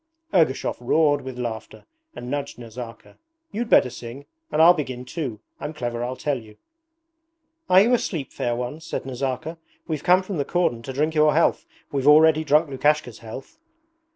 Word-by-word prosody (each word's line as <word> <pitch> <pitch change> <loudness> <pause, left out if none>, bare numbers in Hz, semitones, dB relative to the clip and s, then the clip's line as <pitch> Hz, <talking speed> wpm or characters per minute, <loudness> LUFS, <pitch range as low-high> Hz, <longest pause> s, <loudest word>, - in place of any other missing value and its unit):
Ergushov 160 -8 +2
roared 145 +3 +2
with 130 -1 -8
laughter 115 -3 -6 0.3
and 125 +1 -7
nudged 140 -1 -3
Nazarka. 115 0 -10 0.3
'You'd 230 +3 -3
better 125 - +5
sing. 120 +3 -9 0.3
And 150 - 0
I'll 170 +2 +8
begin 130 -6 -5
too. 125 -7 -5 0.2
I'm 155 - -6
clever, 120 -4 -3
I 125 - -2
tell 140 0 -2
you.' 110 -2 -16 1.1
'Are 185 +1 +7
you 235 +5 +3
asleep, 165 - -1
fair 120 -1 -1
ones?' 125 +6 -5
said 165 - -5
Nazarka. 135 +5 -4 0.3
'We've 155 -3 -3
come 185 +1 +4
from 185 -1 -5
the 145 - +1
cordon 155 -8 0
to 130 +3 -7
drink 155 +4 0
your 150 -1 +4
health. 165 - +2 0.2
We've 140 -1 -1
already 155 +1 +6
drunk 150 +2 +3
Lukashka's 140 -3 0
health.' 125 - -10
140 Hz, 170 wpm, -23 LUFS, 125-160 Hz, 1.1 s, I'll